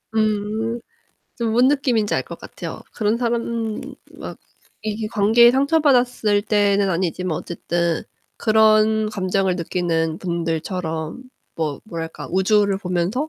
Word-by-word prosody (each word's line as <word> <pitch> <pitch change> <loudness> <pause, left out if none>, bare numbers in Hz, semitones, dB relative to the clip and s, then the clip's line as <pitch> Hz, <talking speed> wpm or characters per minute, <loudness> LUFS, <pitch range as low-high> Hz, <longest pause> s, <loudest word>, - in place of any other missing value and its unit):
음. 215 +2 0 0.6
저 235 - -3
뭔 240 +4 +4
느낌인지 250 -7 +1
알 - - +1
것 - - -10
같아요. - - -8
그런 215 0 +1
사람 235 -2 -2 0.4
막 - - -8 0.4
이게 215 0 -3
관계에 225 +3 +5
상처받았을 255 -7 +3
때는 205 -1 +2
아니지만 180 -1 -1
어쨌든 170 0 -2 0.4
그런 215 0 +4
감정을 190 -2 0
느끼는 165 -2 -1
분들처럼 165 +1 -3 0.3
뭐 155 -3 -3
뭐랄까 165 -5 -6
우주를 195 +1 +2
보면서 185 - -1
210 Hz, 260 characters per minute, -21 LUFS, 175-225 Hz, 0.6 s, 관계에